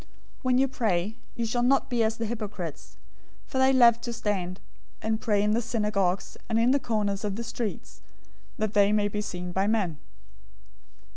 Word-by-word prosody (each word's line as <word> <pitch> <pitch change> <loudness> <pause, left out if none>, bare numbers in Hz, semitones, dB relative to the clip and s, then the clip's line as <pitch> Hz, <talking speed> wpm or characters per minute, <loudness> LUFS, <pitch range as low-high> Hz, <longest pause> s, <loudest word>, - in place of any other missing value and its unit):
006:005 - - -23 0.3
"When 255 -1 +2
you 270 +1 +4
pray, 215 -4 -1 0.2
you 235 - -1
shall 240 +2 0
not 270 +3 +3
be 240 -3 +1
as 220 0 0
the 230 - -2
hypocrites, 210 -8 -6 0.5
for 260 - -3
they 265 0 +5
love 235 -3 +6
to 240 - -4
stand 195 -5 -2 0.4
and 220 0 -1
pray 205 -2 +2
in 210 - +2
the 230 +2 +2
synagogues 210 -5 -1
and 225 - +1
in 235 +2 +4
the 280 - +3
corners 210 -4 -1
of 205 -2 -2
the 235 - -4
streets, 225 -1 -5 0.6
that 215 -1 -1
they 205 0 +5
may 210 -1 +2
be 210 +1 -2
seen 180 -3 -5
by 190 +2 +1
men. 195 -9 0
215 Hz, 190 wpm, -27 LUFS, 200-235 Hz, 0.6 s, love